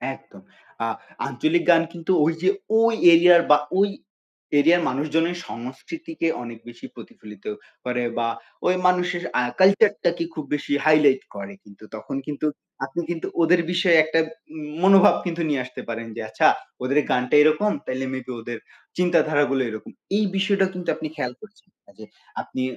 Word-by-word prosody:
একদম। -, -, -18 dB, 0.4 s
আ -, -, 0 dB, 0.4 s
আঞ্চলিক 320 Hz, +2 st, 0 dB
গান 165 Hz, -, +5 dB
কিন্তু 170 Hz, +1 st, -3 dB
ওই 165 Hz, -, +2 dB
যে 185 Hz, -, +3 dB, 0.3 s
ওই 230 Hz, 0 st, +3 dB, 0.2 s
এরিয়ার 170 Hz, +1 st, +7 dB
বা 150 Hz, -, +8 dB, 0.2 s
ওই 200 Hz, +1 st, +4 dB, 0.7 s
এরিয়ার 170 Hz, +4 st, +4 dB
মানুষজনের 160 Hz, +6 st, -1 dB
সংস্কৃতিকে 135 Hz, -, -6 dB, 0.2 s
অনেক 115 Hz, -1 st, -9 dB
বেশি 120 Hz, -, -12 dB
প্রতিফলিত 105 Hz, -2 st, -13 dB, 0.4 s
করে 125 Hz, 0 st, -1 dB
বা 115 Hz, 0 st, 0 dB, 0.4 s
ওই 180 Hz, -, +3 dB
মানুষের 180 Hz, -1 st, 0 dB, 0.2 s
আ -, -, +3 dB, 0.2 s
কালচার 200 Hz, +3 st, +5 dB
টাকে 170 Hz, 0 st, +1 dB
খুব 155 Hz, -, -5 dB
বেশি 145 Hz, 0 st, -4 dB
হাইলাইট 150 Hz, -4 st, +5 dB
করে 100 Hz, 0 st, -7 dB
কিন্তু। 100 Hz, +1 st, -17 dB
তখন 110 Hz, -, -7 dB
কিন্তু 150 Hz, 0 st, -4 dB, 0.4 s
আপনি 135 Hz, +5 st, -4 dB
কিন্তু 170 Hz, -2 st, -3 dB
ওদের 170 Hz, +1 st, +4 dB
বিষয়ে 175 Hz, -2 st, +4 dB
একটা 160 Hz, +1 st, 0 dB, 0.3 s
উম 155 Hz, -1 st, -7 dB, 0.2 s
মনোভাব 195 Hz, +1 st, +7 dB
কিন্তু 170 Hz, -1 st, -3 dB
নিয়ে 140 Hz, -3 st, 0 dB
আসতে 125 Hz, -, -9 dB
পারেন 115 Hz, 0 st, -5 dB
যে -, -, -5 dB
আচ্ছা -, -, +3 dB, 0.4 s
ওদের 140 Hz, +3 st, 0 dB
গানটা 125 Hz, +2 st, +1 dB
এরকম 155 Hz, +8 st, +3 dB
তাইলে 130 Hz, +1 st, -3 dB
মেবি 130 Hz, -1 st, -6 dB
ওদের 115 Hz, 0 st, -6 dB, 0.4 s
চিন্তাধারা 165 Hz, -4 st, +2 dB
গুলো 135 Hz, -1 st, +1 dB
এরকম। 110 Hz, -1 st, -8 dB, 0.3 s
এই 215 Hz, -, +2 dB
বিষয়টা 195 Hz, 0 st, +2 dB
কিন্তু 180 Hz, -1 st, -5 dB
আপনি 155 Hz, 0 st, -5 dB
খেয়াল 125 Hz, -5 st, -3 dB
করছেন। 215 Hz, -1 st, -17 dB, 0.2 s
কাজে 105 Hz, +2 st, -14 dB, 0.4 s
আপনি 130 Hz, -, -5 dB
155 Hz, 160 wpm, -23 LUFS, 130-180 Hz, 0.7 s, বা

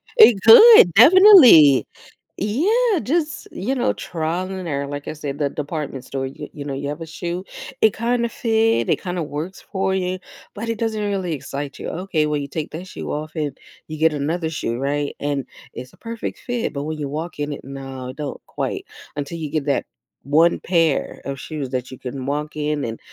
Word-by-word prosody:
It 245 Hz, -, +7 dB
could, 225 Hz, -, +9 dB
definitely, 255 Hz, -, +8 dB, 0.5 s
yeah, 385 Hz, -, +1 dB
just, 310 Hz, +2 st, -2 dB
you 250 Hz, +9 st, -3 dB
know 245 Hz, -, +1 dB
trial 170 Hz, +3 st, -3 dB
and 185 Hz, -2 st, -6 dB
error, 140 Hz, -2 st, -2 dB
like 145 Hz, 0 st, -7 dB
I -, -, -3 dB
said, 145 Hz, -1 st, -6 dB
the 145 Hz, -1 st, +1 dB
department 145 Hz, -3 st, -5 dB
store, 135 Hz, -1 st, -4 dB
you 150 Hz, +2 st, -9 dB
you 145 Hz, -, -7 dB
know 140 Hz, -, -4 dB
you 140 Hz, +1 st, -4 dB
have 150 Hz, +3 st, -6 dB
a -, -, -4 dB
shoe; 175 Hz, +3 st, -5 dB, 0.4 s
It 220 Hz, -2 st, +5 dB
kinda 235 Hz, +1 st, 0 dB
fit. 225 Hz, -1 st, +1 dB
It -, -, +1 dB
kinda 180 Hz, -3 st, -3 dB
works 155 Hz, +6 st, -6 dB
for 190 Hz, 0 st, -2 dB
you, 185 Hz, 0 st, -2 dB, 0.3 s
but 230 Hz, +2 st, -6 dB
it 230 Hz, -, -2 dB
doesn't 220 Hz, -2 st, -1 dB
really 190 Hz, -5 st, -2 dB
excite 140 Hz, 0 st, -6 dB
you. -, -, -5 dB
Okay, 170 Hz, -4 st, -1 dB
well, 150 Hz, -1 st, -1 dB
you 140 Hz, -, -5 dB
take 155 Hz, +1 st, -5 dB
that 175 Hz, +4 st, -7 dB
shoe -, -, -7 dB
off 155 Hz, +1 st, -4 dB
and 150 Hz, -3 st, -3 dB, 0.3 s
you 155 Hz, 0 st, -7 dB
get 160 Hz, 0 st, +3 dB
another 160 Hz, +3 st, -2 dB
shoe, 120 Hz, -6 st, -3 dB
right? 145 Hz, +2 st, -2 dB
And 140 Hz, -2 st, -2 dB, 0.3 s
it's 125 Hz, 0 st, -9 dB
a -, -, -20 dB
perfect 230 Hz, 0 st, -6 dB
fit, 245 Hz, -8 st, -3 dB
but 140 Hz, 0 st, -4 dB
when 155 Hz, 0 st, -4 dB
you 140 Hz, -2 st, -3 dB
walk 155 Hz, +1 st, -6 dB
in 145 Hz, 0 st, -2 dB
it, -, -, -9 dB
no, 135 Hz, -1 st, -7 dB
don't 145 Hz, -2 st, -6 dB
quite -, -, -4 dB, 0.3 s
until 145 Hz, +3 st, -5 dB
you 155 Hz, -2 st, -4 dB
get 155 Hz, -3 st, -1 dB
that 140 Hz, -, 0 dB, 0.4 s
one 160 Hz, +5 st, +3 dB
pair 165 Hz, -5 st, 0 dB
of 135 Hz, -1 st, -5 dB
shoes 145 Hz, -4 st, -5 dB
that 125 Hz, -1 st, -3 dB
you 130 Hz, -, -9 dB
can 130 Hz, 0 st, -6 dB
walk 150 Hz, +2 st, -3 dB
in 150 Hz, -1 st, -2 dB
and, 115 Hz, 0 st, -5 dB
155 Hz, 200 wpm, -21 LUFS, 145-195 Hz, 0.5 s, could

